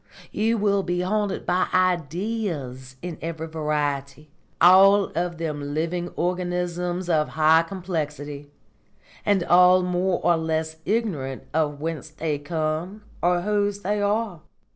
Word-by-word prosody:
You 225 +2 +1
will 200 -1 +2
be 180 -1 -1
haunted 205 +1 -1
by 180 +1 +1
Ideas 175 - -1
in 175 -3 -6
every 160 0 -4
variety, 150 -2 -3 0.3
all 195 +3 +6
of 175 +1 -2
them 145 -3 -4
living 170 +2 -2
organisms 180 0 -2
of 155 -3 +1
high 160 +1 +6
complexity, 150 -5 -5 0.8
and 200 -3 +3
all 180 +1 +6
more 180 0 0
or 170 - +4
less 160 0 -2
ignorant 175 - -2
of 150 -2 0
whence 155 -1 -4
they 155 -1 -3
come 160 +6 -3 0.2
or 175 0 +2
whose 205 +1 0
they 205 +1 -1
are. 205 -4 -1
175 Hz, 125 wpm, -24 LUFS, 155-185 Hz, 0.8 s, all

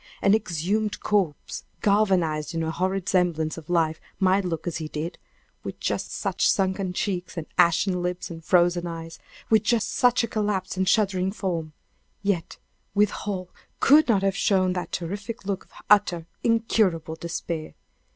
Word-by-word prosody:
An 200 - +5
exhumed 210 +1 0
corpse 190 -8 -1 0.2
galvanized 180 -7 +2
into 165 0 0
a 160 - -1
horrid 185 +2 -1
semblance 170 -4 +1
of 165 -1 -11
life 160 -2 +1 0.2
might 190 0 +3
look 165 -3 -3
as 170 -1 -2
he 160 -1 -4
did 155 +3 -5 0.4
with - - -6
just - - -2
such - - 0
sunken 190 -1 +1
cheeks 180 -1 -3
and 165 - -3
ashen 180 +1 +3
lips 180 0 -3
and 165 -1 -8
frozen 175 0 +3
eyes; 165 -1 -7 0.3
with 220 -2 +6
just 225 -2 +1
such 245 0 +3
a - - 0
collapsed 205 -5 -1
and 190 0 +1
shuddering 190 -3 +2
form; 170 -6 -3 0.5
yet, 195 -5 -1 0.4
withal, 200 -2 0 0.3
could 300 +3 +6
not 205 -5 +3
have 195 -1 +1
shown 185 -3 +2
that 180 -1 -4
terrific 200 +5 -5
look 195 -1 -3
of - - -31 0.2
utter, 180 -5 +4 0.2
incurable 215 -8 +1
despair! 165 -1 -5
185 Hz, 155 wpm, -25 LUFS, 170-200 Hz, 0.5 s, with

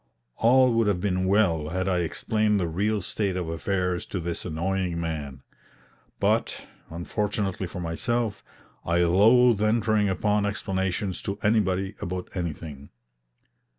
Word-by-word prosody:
All 125 +1 +5
would 115 -1 +2
have 100 -4 +1
been 95 -1 0
well 90 -7 +2
had 95 +3 -2
I 90 -2 +1
explained 105 +5 +1
the 90 - 0
real 100 +6 0
state 95 0 -2
of 90 -3 -3
affairs 90 +2 -1
to 95 - -4
this 85 0 -4
annoying 90 +1 -2
man; 75 -5 -5 0.8
but, - - 0 0.2
unfortunately 95 +2 -2
for 90 - -7
myself, 105 +6 -2 0.4
I 85 +1 +2
loathe 110 +6 +5
entering 110 -1 +2
upon 105 +2 +1
explanations 95 -2 -2
to 100 0 -4
anybody 95 -2 +1
about 90 +1 -4
anything. 80 -5 -5
95 Hz, 130 wpm, -26 LUFS, 85-105 Hz, 0.8 s, All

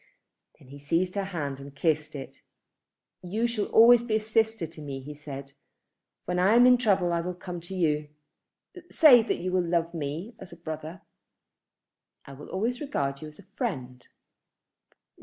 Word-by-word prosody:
Then 130 - -19
he 140 +1 -11
seized 165 +6 0
her 200 -1 -2
hand 145 -8 -4
and 140 0 -11
kissed 155 0 0
it. 135 -2 -9 0.8
"You 210 +6 -2
shall 235 -3 -1
always 235 +1 +7
be 235 -2 -1
a - - +3
sister 220 -2 0
to 160 0 -12
me," 140 -2 -6
he 145 +3 -9
said. 140 -2 -9 0.7
"When 180 +1 -1
I 195 +5 +4
am 245 +1 +7
in 250 -1 +6
trouble 190 -7 +2
I 170 - 0
will 180 +1 -4
come 180 -1 -7
to 175 +3 -8
you. 150 -4 0 0.8
Say 265 -7 +7
that 225 - -2
you 185 +1 -3
will 185 0 +2
love 170 -1 -1
me 160 +8 -5
as 190 - -11
a - - -10
brother." 160 +1 -7 1.2
"I 140 - -11
will 140 +2 -11
always 235 +7 -2
regard 140 - -2
you 155 - -7
as 150 - -13
a - - -15
friend." 130 - -4
175 Hz, 175 wpm, -27 LUFS, 150-215 Hz, 1.2 s, always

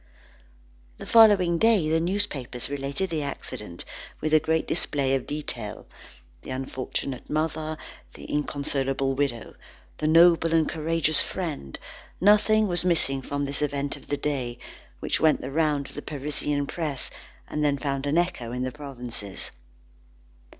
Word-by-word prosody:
The - - -8
following 200 -7 +6
day, 220 -8 +4
the 160 +1 +2
newspapers 165 -9 -2
related 140 +6 -2
the 160 -2 -1
accident 105 -9 -5 0.3
with 155 0 -1
a 155 - +8
great 160 +1 0
display 140 -5 +1
of 135 -2 -1
detail: 125 -8 -5 0.6
the - - -11
unfortunate 130 0 -4
mother, 155 0 -1 0.4
the - - -10
inconsolable 135 -2 -1
widow, 135 -5 -2 0.5
the 155 - 0
noble 165 0 +6
and 160 -1 +3
courageous 160 -1 +1
friend, 155 - -4 0.4
nothing 210 +2 +5
was 175 -2 +1
missing 160 -6 +3
from 145 +2 -2
this 140 +1 -2
event 145 -1 -1
of - - -15
the 145 - -1
day, 135 -5 -2 0.4
which - - 0
went 155 -1 +4
the 130 - -5
round 150 -2 +1
of - - -13
the 145 - -6
Parisian 145 0 -2
press, 150 -3 -2 0.4
and 150 - -2
then 145 -1 +2
found 140 0 -2
an 145 +3 +2
echo 175 -10 0
in 125 +1 -2
the 130 - -2
provinces. 125 -8 -5
145 Hz, 145 wpm, -26 LUFS, 135-165 Hz, 0.6 s, a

